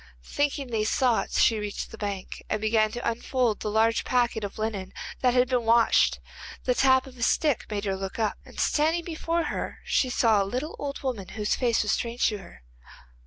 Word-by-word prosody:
Thinking 285 -3 -1
these 215 -1 0
thoughts 250 -4 +1
she 225 -2 +3
reached 210 -1 -5
the - - -8
bank, 200 -3 -5
and 215 - 0
began 215 0 +2
to 240 - -3
unfold 235 -1 0
the 210 - -3
large 225 +2 +2
packet 240 -3 +1
of 200 +1 -5
linen 205 -4 -3 0.3
that 250 -1 +2
had 250 0 +4
to 250 - +3
be - - -8
washed. 230 0 +4 0.4
The 250 - +2
tap 260 0 +4
of 255 -2 -13
a - - -9
stick 290 +3 +1
made 210 -1 -3
her 195 -1 0
look 190 0 -5
up, 220 -3 -1
and - - -12
standing 320 +3 +1
before 335 0 -1
her - - -4
she 255 - +1
saw 225 -4 +3
a - - +2
little 255 +10 -4
old 280 -1 -5
woman, 235 -8 -3
whose 210 -1 0
face 235 -4 +1
was 210 - 0
strange 235 +1 0
to 210 -2 -4
her. 170 - -14
230 Hz, 210 wpm, -26 LUFS, 210-255 Hz, 0.4 s, had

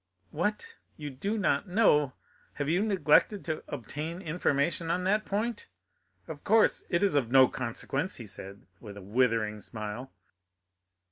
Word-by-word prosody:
"What, 210 - -3 0.2
you 150 -2 -6
do 195 +12 -3
not 190 -5 +1
know! 150 - +3 0.4
Have 145 - -3
you 175 +5 +2
neglected 200 -1 +3
to 155 -2 -3
obtain 150 +6 -5
information 165 -1 0
on 180 +2 0
that 210 +3 +1
point? 215 +3 -2 0.6
Of 150 -2 -8
course 220 +1 +4
it 170 +3 +1
is 200 - +3
of 135 -6 +1
no 130 0 +7
consequence," 135 +7 -3
he 120 - -7 0.2
added, 100 +1 -10
with 105 -3 -10
a 100 - -9
withering 110 0 +1
smile. 110 +4 -6
150 Hz, 145 wpm, -29 LUFS, 125-190 Hz, 0.6 s, no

